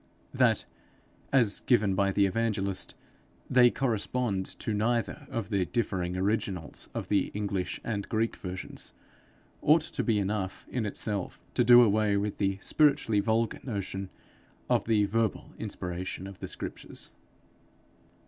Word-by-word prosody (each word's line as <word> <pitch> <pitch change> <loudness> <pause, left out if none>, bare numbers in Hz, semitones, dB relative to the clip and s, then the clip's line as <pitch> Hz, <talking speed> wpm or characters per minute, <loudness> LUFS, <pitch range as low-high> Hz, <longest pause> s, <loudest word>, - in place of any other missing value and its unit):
That, - - +3 0.7
as 120 -7 +4
given 110 -6 +3
by 100 +1 +2
the 100 +1 +3
evangelist, 100 -2 -1 0.5
they 125 -1 +6
correspond 120 -5 -1
to 110 - -3
neither 120 +6 -1
of 115 -8 -4
the 95 -3 +1
differing 90 -3 -1
originals 95 -4 -2
of - - -3
the 100 -2 +2
English 100 -3 -2
and 100 -3 -3
Greek 115 +1 0
versions, 90 0 -6 0.7
ought 155 +2 +5
to 160 - -3
be 115 -3 +2
enough 100 -1 -2
in 120 -4 -1
itself 100 -1 -3
to - - +3
do 120 0 +9
away 105 -2 +3
with 100 +1 -2
the 95 -1 +1
spiritually 140 -8 +3
vulgar 110 +2 +1
notion 100 -4 -4 0.6
of - - +3
the 110 -2 +3
verbal 110 +1 -1
inspiration 90 +1 -4
of 100 -1 -9
the - - -5
Scriptures. - - -6
105 Hz, 135 wpm, -29 LUFS, 95-115 Hz, 0.7 s, do